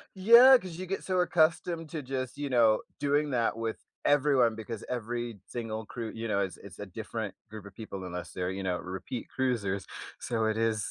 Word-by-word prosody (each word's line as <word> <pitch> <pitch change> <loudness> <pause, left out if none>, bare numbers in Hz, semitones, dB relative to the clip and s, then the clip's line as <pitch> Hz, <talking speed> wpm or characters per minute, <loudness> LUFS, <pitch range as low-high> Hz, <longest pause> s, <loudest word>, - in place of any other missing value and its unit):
Yeah, 235 +7 +9
'cause 185 -7 -8
you 185 - -5
get 195 +2 -3
so 185 -1 +1
accustomed 165 -1 +2
to 160 -3 -4
just, 130 -1 -4
you 145 -1 -3
know, 115 -4 +4 0.2
doing 145 +1 +1
that 115 -3 +1
with 115 -1 -3 0.3
everyone 135 -5 +4
because 110 0 -6
every 120 -2 -3
single 110 -2 -5
crew, 115 -1 -5
you 115 0 -4
know, 100 -1 +1
is 95 -2 -3
is 95 -2 -12
a 100 - -5
different 110 +1 -5
group 110 -1 -9
of 100 - -12
people 100 -4 -7
unless 90 -1 -6
they're, 90 0 -2
you 95 +1 -4
know, 90 -2 0
repeat 95 +7 -6
cruisers. 105 -7 -1 0.3
So, 115 -2 -1
it 110 0 0
is 110 -2 0
115 Hz, 200 wpm, -30 LUFS, 105-145 Hz, 0.3 s, Yeah